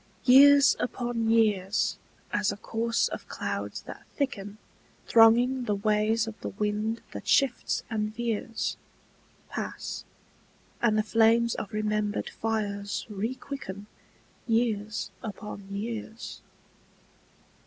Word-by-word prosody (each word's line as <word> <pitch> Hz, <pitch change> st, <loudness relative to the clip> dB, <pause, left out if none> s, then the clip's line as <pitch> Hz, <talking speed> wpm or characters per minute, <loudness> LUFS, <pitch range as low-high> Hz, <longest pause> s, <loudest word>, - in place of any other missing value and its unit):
YEARS 280 Hz, +2 st, +8 dB
upon 240 Hz, -2 st, -1 dB
years, 210 Hz, -3 st, +2 dB, 0.4 s
as 200 Hz, -, +2 dB
a 200 Hz, -, -6 dB
course 230 Hz, +2 st, 0 dB
of -, -, -7 dB
clouds -, -, -4 dB
that -, -, -9 dB
thicken 205 Hz, -7 st, -3 dB, 0.5 s
Thronging 240 Hz, +3 st, +5 dB
the 210 Hz, -, +1 dB
ways 215 Hz, +2 st, +2 dB
of 225 Hz, -, -5 dB
the -, -, -3 dB
wind 210 Hz, +2 st, -2 dB
that -, -, -8 dB
shifts 270 Hz, -3 st, +2 dB
and 215 Hz, -2 st, -2 dB
veers, 230 Hz, 0 st, -2 dB, 0.7 s
Pass, -, -, -5 dB, 0.8 s
and 215 Hz, -2 st, +3 dB
the 215 Hz, -, +3 dB
flames 230 Hz, +1 st, +4 dB
of 200 Hz, -, -5 dB
remembered 210 Hz, -1 st, -1 dB
fires 205 Hz, -2 st, -2 dB
requicken 210 Hz, -1 st, -5 dB, 0.6 s
Years 220 Hz, -2 st, 0 dB
upon 205 Hz, -2 st, -7 dB
years. 220 Hz, +2 st, -5 dB
220 Hz, 105 wpm, -28 LUFS, 210-235 Hz, 0.8 s, YEARS